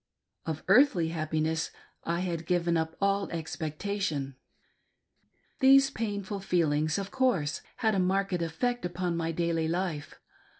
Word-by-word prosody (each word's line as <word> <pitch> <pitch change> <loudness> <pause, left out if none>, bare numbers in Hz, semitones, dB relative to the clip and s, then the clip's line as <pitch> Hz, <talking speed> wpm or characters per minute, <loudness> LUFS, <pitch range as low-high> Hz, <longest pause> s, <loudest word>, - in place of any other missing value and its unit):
Of 155 -1 -3
earthly 195 - +5
happiness 160 0 -1 0.4
I 170 +1 -1
had 170 -3 -3
given 175 -1 +1
up 160 0 -1
all 200 0 +1
expectation. 160 -2 -3 1.2
These 275 0 +6
painful 205 -4 -3
feelings, 155 -5 +1
of 200 0 -4
course, 245 - +1 0.2
had 220 -3 +2
a 195 - +1
marked 195 +1 +1
effect 245 +10 -1
upon 175 0 -2
my 165 0 -1
daily 165 -1 0
life. 170 -3 -3
175 Hz, 125 wpm, -29 LUFS, 160-200 Hz, 1.2 s, These